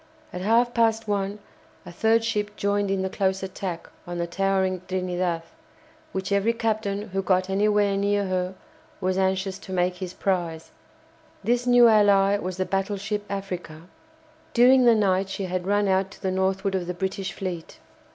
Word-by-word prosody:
At 180 - -5
half 235 +4 +3
past 225 -1 +2
one 200 0 -1 0.5
a - - -9
third 225 +5 +2
ship 210 -2 -2
joined 200 0 0
in 195 -1 0
the - - 0
close 190 -1 0
attack 185 -2 -5 0.2
on 175 0 -4
the 170 - -1
towering 190 0 0
"Trinidad," 180 -2 -1 0.7
which 190 +1 -4
every 200 +3 +2
captain 215 -2 -2
who 195 +1 -1
got 185 0 +1
anywhere 205 0 +2
near 200 0 +1
her 185 0 -2 0.4
was 185 -1 0
anxious 190 0 0
to 190 - -11
make 180 0 0
his 185 -1 -6
prize. 170 -4 -2 0.7
This 245 +1 +1
new 245 -1 +7
ally 205 -2 +4
was 185 -1 -4
the 185 - 0
battleship 200 +2 -2
"Africa." 180 -5 -5 0.7
During 250 +1 +6
the 235 -1 +6
night 195 -2 +1
she 195 - -4
had 185 0 -3
run 205 0 +2
out 190 0 +1
to - - -17
the 190 - 0
northward 190 +1 0
of 185 -2 -2
the 180 - -3
British 190 0 -3
fleet. 175 -4 -6
195 Hz, 170 wpm, -25 LUFS, 185-205 Hz, 0.7 s, new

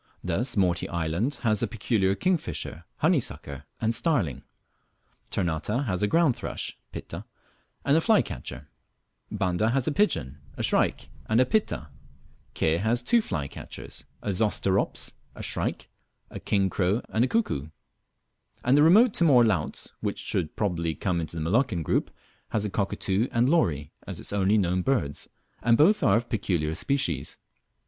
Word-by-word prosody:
Thus 105 +8 -1
Morty 90 -3 +1
island 85 - -1
has 110 -3 +2
a - - +1
peculiar 100 -3 +1
kingfisher, 100 - -2 0.2
honeysucker, 70 +1 0
and 115 0 +1
starling; 115 - +1 0.9
Ternate 85 -5 -1 0.2
has 95 -6 -1
a 105 - +3
ground 160 0 +3
thrush - - -4 0.2
(Pitta) - - -7 0.6
and 140 - +4
a 165 - +4
flycatcher; 75 - 0 0.6
Banda 105 +1 0
has 125 +1 +1
a - - +2
pigeon, 75 - 0 0.2
a - - -2
shrike, - - +1 0.2
and 110 - +3
a 130 - +5
Pitta; 205 - 0 0.7
Ke 80 +2 +1
has 120 +3 +1
two 235 - +4
flycatchers, 75 - -6 0.2
a - - -2
Zosterops, 100 -1 0 0.2
a - - -8
shrike, - - -3 0.4
a - - -6
king 100 -2 +1
crow 95 +4 0
and 110 - +2
a - - +3
cuckoo; 130 - 0 1.0
and 125 +3 +5
the 145 - +5
remote 205 +9 +6
Timor 135 -8 +5
Laut, 95 -9 -1
which - - -2
should 85 -5 -2
probably 85 -6 -1
come 90 -4 -1
into 80 +1 -6
the 80 - -2
Moluccan 105 - +1
group, - - 0 0.4
has 105 -1 0
a 105 - -3
cockatoo 100 +2 0
and 120 0 +2
lory 85 - +1 0.2
as - - -5
its - - -6
only 100 +1 +3
known 90 -2 +1
birds, 90 - -1 0.3
and 115 -1 +4
both 200 +8 +5
are - - +4
of 120 +1 -3
peculiar 85 -9 -1
species. 85 - -1
100 Hz, 155 wpm, -27 LUFS, 85-125 Hz, 1.0 s, remote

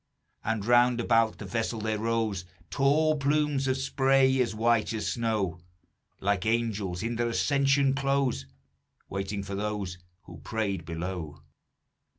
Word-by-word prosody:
And 110 -2 -1
round 120 +1 +4
about 115 -1 +2
the - - -8
vessel 115 0 -2
there 110 0 -1
rose 110 -4 -1 0.3
Tall 150 - +3
plumes 145 -1 +1
of 130 0 +1
spray 135 0 +3
as 115 -3 -1
white 115 0 +2
as 110 - -2
snow, 105 -7 -1 0.6
Like 100 -2 0
angels 110 -5 -1
in 115 0 -2
their 120 0 +1
ascension 140 +2 +2
clothes, 135 - 0 0.6
Waiting 100 +1 -3
for 100 0 -6
those 100 -3 -3 0.2
who 85 -2 -12
prayed 100 +1 -3
below. 85 -2 -5
115 Hz, 135 wpm, -28 LUFS, 100-130 Hz, 0.6 s, round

